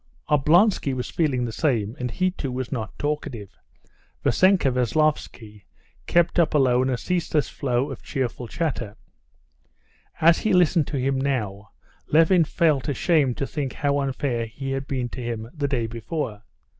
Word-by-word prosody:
Oblonsky 150 +1 +3
was 125 - -4
feeling 135 -7 0
the 115 - -4
same, 115 -5 0
and 125 0 -2
he 185 +9 0
too 140 -7 -5
was 125 -1 -4
not 115 -6 -4
talkative. 130 -9 -4 0.7
Vassenka 185 -7 +3
Veslovsky 125 -5 -1 0.4
kept 175 +1 +2
up 165 -2 +2
alone 130 -2 +3
a 125 - 0
ceaseless 165 -1 -1
flow 135 0 -1
of 135 - -8
cheerful 130 -3 -3
chatter. 120 -7 -3 1.2
As 165 +1 +5
he 220 - 0
listened 175 -3 +3
to 145 - -3
him 130 +1 0
now, 105 -8 -2 0.4
Levin 165 +2 +4
felt 155 -3 +1
ashamed 145 -3 +1
to 140 - -1
think 140 -2 -4
how 145 0 0
unfair 130 -4 -2
he 135 +4 -6
had 135 0 -3
been 130 -3 -2
to 125 - -7
him 115 -2 -4
the 145 -3 -2
day 125 -5 -1
before. 115 -1 -5
135 Hz, 155 wpm, -24 LUFS, 120-155 Hz, 1.2 s, As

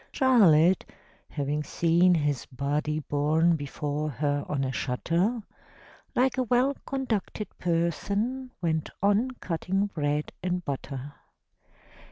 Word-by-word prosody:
Charlotte, 190 - +5 0.5
having 145 +1 -2
seen 170 +3 +3
his 145 -5 -1
body 145 +3 -1
Borne 155 +4 +2
before 150 +1 -3
her 145 +1 -1
on 140 -2 0
a 130 - -1
shutter, 170 - 0 0.7
Like 260 +1 +2
a - - +3
well 255 +3 +2
conducted 225 -6 -3
person, 200 - -1
Went 160 -2 0
on 205 +5 +3
cutting 185 +3 -1
bread 150 -6 -2
and 180 -1 -2
butter. 140 0 -5
165 Hz, 110 wpm, -27 LUFS, 145-205 Hz, 0.7 s, Charlotte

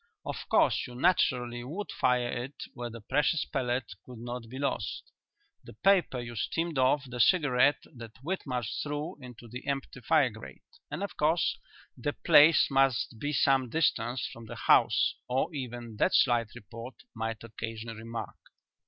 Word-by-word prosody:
Of - - -6
course - - +3
you 125 - -10
naturally 125 -7 +1
would 170 +11 -5
fire 125 -1 +2 0.2
it 140 +2 -13 0.2
where 120 0 -5
the 115 0 -9
precious 150 +7 +1
pellet 125 -6 -2
could 125 -2 -11
not 120 0 -6
get 130 +3 -6
lost 140 -8 -2 0.6
the - - -12
paper 180 - +3
you 120 -1 -6
steamed 165 +5 -1
off 130 +2 +3
the 125 0 -7
cigarette 145 -2 +4
that 115 -2 -10
Whitmarsh 135 - -3
threw 150 +4 -4
into 125 -2 -11
the 125 +3 -9
empty 135 -2 -3
fire 140 -1 +3
grate; 110 +1 -11 0.3
and 195 - -4
of 200 - -5
course 160 +3 +2 0.4
the 145 +4 -3
place 150 0 +6
must 135 -4 +2
be 145 +4 -2
some 135 -3 +3
distance 120 -4 0
from 115 -1 -11
the 115 - -7
house 120 +2 +4
or 135 +7 0
even 120 -5 -6
that - - +2
slight 120 -3 +3
report 115 +2 -9 0.2
might 115 -1 -4
occasion 115 0 -6
remark." 115 +1 -6
125 Hz, 160 wpm, -29 LUFS, 115-145 Hz, 0.6 s, place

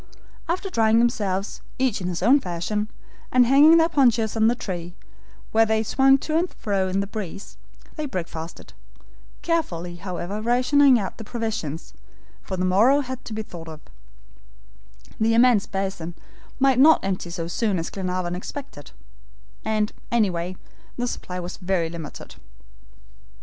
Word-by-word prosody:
After 370 +3 -2
drying 225 -5 +3
themselves, 205 -4 0 0.2
each 255 -6 0
in 180 - -3
his 175 0 -3
own 260 +7 +6
fashion, 190 +3 -3 0.4
and 250 -1 +5
hanging 290 +6 +7
their 325 0 +5
ponchos 240 -9 +2
on 220 0 +3
the 235 - +3
tree, 175 -5 -6 0.6
where 225 +1 +5
they 220 0 +1
were - - -2
swung 270 +4 +4
to 310 +3 -3
and 350 +1 -1
fro 195 -3 -1
in 190 +1 0
the - - -2
breeze, 200 -2 -7 0.4
they 305 -1 -3
breakfasted, 165 - -6 0.7
carefully 175 - -2
however 185 +3 -5
rationing 255 +3 +4
out 200 0 -4
the - - -6
provisions, 215 - -4 0.5
for 190 - -5
the 185 - 0
morrow 225 +10 +4
had 260 -1 -6
to 220 - -6
be 220 0 -3
thought 170 -5 -10
of; 155 -1 -9 1.4
the 225 +1 +3
immense 235 -3 +4
basin 190 -4 -4 0.4
might 265 -2 +4
not 310 -5 +6
empty 185 -2 -2
so 170 -1 -4
soon 200 +2 0
as 165 - -4
Glenarvan 185 -2 -3
expected, 185 - -7 0.7
and, 215 -1 0 0.2
anyway, 185 -6 0 0.4
the 245 - -1
supply 180 -6 -5
was 180 +1 -6
very 180 -3 -1
limited. 165 -4 -9
210 Hz, 150 wpm, -24 LUFS, 180-245 Hz, 1.4 s, hanging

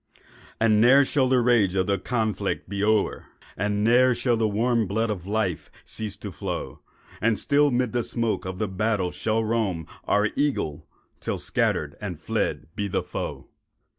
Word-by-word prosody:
And 110 -1 +4
ne'er 135 +4 +7
shall 130 -2 +1
the 130 -1 +4
rage 115 -6 +3
of 95 -1 +2
the 100 -1 0
conflict 110 0 -2
be 100 +1 -3
o'er, 110 -1 +1 0.3
And 105 +1 -1
ne'er 125 +2 +5
shall 120 0 +1
the 110 -1 +1
warm 115 +1 +1
blood 110 +3 0
of 95 -3 -5
life 100 -6 -1 0.2
cease 105 -2 -4
to 100 -1 -7
flow, - - -5 0.4
And 110 0 +2
still 145 +1 +3
'mid 125 -2 0
the 120 - +1
smoke 115 -1 -1
of 95 0 -5
the 110 - -1
battle 100 -1 0
shall 110 0 -1
roam 105 -8 -1 0.2
Our 105 +1 +2
Eagle—till 80 - -3
scattered - - -1
and - - -5
fled - - -2
be 100 - -2
the 95 - -1
foe. - - -5
110 Hz, 165 wpm, -25 LUFS, 100-120 Hz, 0.4 s, ne'er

